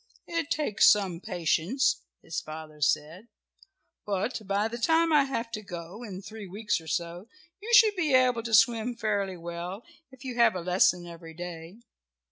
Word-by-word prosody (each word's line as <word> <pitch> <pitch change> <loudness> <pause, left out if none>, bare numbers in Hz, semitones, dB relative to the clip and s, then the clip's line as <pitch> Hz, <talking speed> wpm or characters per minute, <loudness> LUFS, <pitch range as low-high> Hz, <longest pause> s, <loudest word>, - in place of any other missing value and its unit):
"It 335 -3 -3
takes 295 -9 +4
some 190 -5 0
patience," 180 - 0 0.2
his 165 - -3
father 155 -1 -10
said. 160 +8 0 0.8
"But 205 +4 -2
by 200 +2 +1
the 235 +2 -6
time 325 +5 +3
I 290 -2 +5
have 235 -4 -4
to 215 - -4
go 180 +1 -8
in 200 -5 -8
three 215 0 -9
weeks 205 -1 -2
or 160 - -14
so 170 +4 -3 0.3
you 450 +3 -6
should 435 -3 +7
be 330 -6 0
able 250 -2 +3
to 230 0 -6
swim 235 +2 +3
fairly 205 -4 -1
well, 170 +5 -6 0.3
if 260 0 -15
you 255 - -4
have 235 -5 +4
a 180 - -3
lesson 180 0 +2
every 165 -1 -11
day." 175 +4 -8
200 Hz, 170 wpm, -28 LUFS, 175-235 Hz, 0.8 s, should